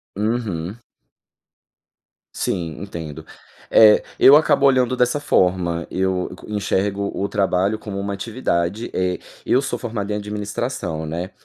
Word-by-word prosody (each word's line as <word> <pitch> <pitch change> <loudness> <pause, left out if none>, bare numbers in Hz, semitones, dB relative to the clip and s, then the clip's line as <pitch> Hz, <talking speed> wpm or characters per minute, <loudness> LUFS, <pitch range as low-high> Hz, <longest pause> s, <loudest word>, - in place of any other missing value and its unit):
Uhum. 105 -4 -2 1.6
Sim, 85 -3 -3
entendo. 80 -6 -7 0.4
Eh, 110 -1 +7 0.2
eu 140 - +9
acabo 150 -2 +3
olhando 130 -2 +3
dessa 125 +3 +1
forma. 90 - +1
Eu 95 -1 -1
enxergo 100 -1 -1
o 100 - -2
trabalho 100 0 +1
como 100 -2 -6
uma 100 +1 -3
atividade. 100 -1 -2
Eh, 90 0 -1 0.3
eu 130 - +3
sou 140 - -3
formado 105 -4 -4
em - - 0
administração, 105 -4 -4
né. 85 +5 -4
100 Hz, 120 wpm, -21 LUFS, 90-110 Hz, 1.6 s, eu